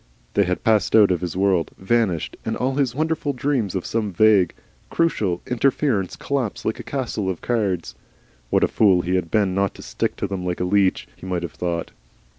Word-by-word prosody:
They 100 - +3
had 90 0 -2
passed 110 -4 +3
out 105 -3 +6
of 90 - 0
his 90 0 -4
world 95 -4 +2
vanished, 95 -4 0
and - - -2
all 130 +2 0
his 130 -3 0
wonderful 155 -1 -1
dreams 125 -7 -1
of 95 - -2
some 110 -3 -1
vague, 105 -1 +4 0.3
crucial 105 - 0
interference 125 -5 0
collapsed 135 -7 -3
like 110 - -1
a - - -6
castle 120 -8 -3
of 90 - -4
cards. 100 -8 -1 0.6
What - - +3
a - - +5
fool 95 -5 +4
he 90 - -1
had 90 -3 0
been 100 -2 +2
not 100 0 0
to - - -11
stick - - -2
to - - -3
them 95 -2 -4
like 90 -1 -2
a - - 0
leech! 95 +1 +2
He - - -10
might 90 -2 -2
have 85 - -5
thought! 85 -1 -3
100 Hz, 205 wpm, -22 LUFS, 90-120 Hz, 0.6 s, out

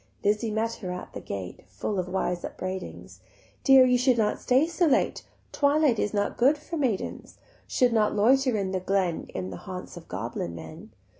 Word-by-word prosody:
Lizzie 210 +2 +1
met 220 +2 -1
her 185 -3 -5
at 180 - -7
the - - -6
gate 95 -2 -6
Full 105 - -3
of 180 - -2
wise 180 -1 -1
upbraidings: 185 0 -6 0.4
"Dear, 270 -2 +8
you 250 -1 +3
should 250 -1 +3
not 215 -2 +1
stay 260 +4 +3
so 340 +1 +1
late, 285 - +1 0.3
Twilight 285 -4 +3
is 205 - 0
not 205 -1 -1
good 275 +5 +5
for 310 +3 -7
maidens; 255 - -2 0.3
Should 250 -2 +2
not 215 -2 +2
loiter 255 +3 +3
in 195 -2 -2
the 190 - -1
glen 185 -2 -1
In 95 0 -4
the 90 - -6
haunts 185 - -8
of 170 - -11
goblin 100 -7 -4
men. 165 - -10
210 Hz, 190 wpm, -27 LUFS, 185-255 Hz, 0.4 s, Dear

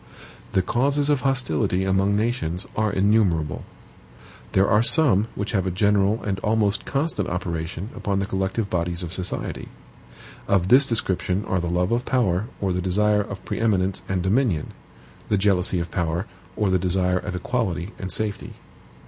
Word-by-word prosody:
The 95 - +2
causes 140 +7 +2
of 140 -3 +1
hostility 110 - +1
among 95 +1 +2
nations 105 -6 -1
are 110 -1 +1
innumerable. 95 -7 +1 0.9
There 95 +1 +3
are 105 0 +4
some 115 - +6
which 100 +1 -3
have 95 -4 0
a - - +1
general 100 +3 +1
and 95 -2 -2
almost 105 -1 0
constant 140 - -1
operation 85 +3 -4
upon 100 -2 -2
the 100 - 0
collective 95 +3 -2
bodies 85 -1 -2
of 85 0 -6
society. 95 -1 -4 0.8
Of 95 -2 +1
this 135 +3 +6
description 95 -4 -1
are 95 - 0
the 85 - -3
love 90 +3 0
of 120 +1 +1
power 110 -7 0
or 95 -2 -1
the 90 - -1
desire 105 +3 +2
of 100 -2 -8
pre - - -4
eminence 100 -4 +1
and 95 -2 -1
dominion 100 - 0 0.6
the 105 - +2
jealousy 95 -2 +2
of 85 -1 -5
power, 85 +1 -1 0.3
or 105 -3 0
the 95 - +2
desire 90 0 +1
of 90 - -5
equality 95 -3 -2
and 95 -1 -5
safety. 105 +1 -4
95 Hz, 165 wpm, -23 LUFS, 90-110 Hz, 0.9 s, some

